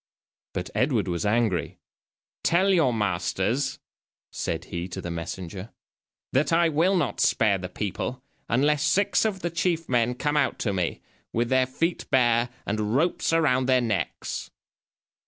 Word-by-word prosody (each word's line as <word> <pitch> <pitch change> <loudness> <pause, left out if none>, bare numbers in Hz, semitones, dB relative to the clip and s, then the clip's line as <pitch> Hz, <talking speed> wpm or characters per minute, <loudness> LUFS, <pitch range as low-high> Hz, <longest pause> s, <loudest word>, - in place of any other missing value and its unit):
But 90 - -4
Edward 115 -3 +1
was 85 +1 -1
angry. 110 -5 0 0.6
"Tell 190 +3 +3
your 160 -8 +4
masters," 105 +4 -1 0.5
said - - -3
he 85 +1 -4
to 90 - -6
the 90 - -5
messenger, 90 +4 -6 0.6
"that 135 +5 +2
I 165 0 +4
will 165 +6 +2
not 170 - -1
spare 100 -3 +3
the 90 0 -5
people 105 +6 -4 0.3
unless 145 +5 +2
six 195 +9 +2
of 195 -4 -1
the 170 - -2
chief 170 -1 0
men 125 -1 +1
come 145 +4 0
out 140 -3 +1
to 100 - 0
me, 90 -3 -2 0.3
with 120 +1 0
their 130 -1 +3
feet 165 +6 -2
bare, 120 -2 +3 0.2
and 105 +2 -1
ropes 165 +4 +1
around 140 -6 +2
their 130 -1 +4
necks." 115 -3 -3
125 Hz, 150 wpm, -26 LUFS, 105-150 Hz, 0.6 s, your